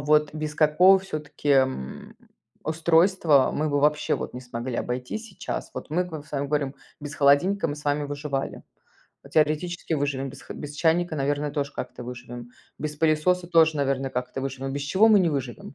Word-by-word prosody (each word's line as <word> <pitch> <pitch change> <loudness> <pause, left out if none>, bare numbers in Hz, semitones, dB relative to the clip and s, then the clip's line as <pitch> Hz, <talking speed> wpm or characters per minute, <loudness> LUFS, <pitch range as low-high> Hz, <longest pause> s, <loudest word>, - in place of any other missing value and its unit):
вот 150 0 +3
без 155 -1 -4
какого 170 +6 +6
всё-таки, 155 -5 -4
м, 130 - 0 0.5
устройства 160 -2 +3
мы 155 0 -1
бы 145 0 +1
вообще 150 +1 +2
вот - - -5
не 125 - -6
смогли 125 0 -5
обойтись 125 - -4
сейчас? 195 - -5
Вот - - -7
мы 175 +4 +1
к 180 - -12
вам, 155 - -5
с - - -21
вами 140 -1 -1
говорим: 140 -1 -1 0.3
без 145 0 -7
холодильника 155 +7 +3
мы 145 - -2
с 150 - -12
вами 145 0 0
выживали, 145 -1 -4 0.6
ну, - - -14
теоретически 160 +3 0
выживем, 140 -2 -1
без - - -12
х - - -9
без 145 -1 -7
чайника, 165 +1 +1
наверное, 145 +1 -1
тоже 145 -1 -2
как-то 125 0 -6
выживем, 120 0 -8 0.3
без 150 0 -4
пылесоса 165 +3 +2
тоже, 160 -2 +4
наверное, 135 -1 0
как-то 125 +1 -4
выживем, 135 0 -4
без 140 +1 -3
чего 190 +10 +4
мы 215 -2 +7
не 175 - +3
выживем? 130 -2 -5
150 Hz, 185 wpm, -25 LUFS, 135-160 Hz, 0.6 s, мы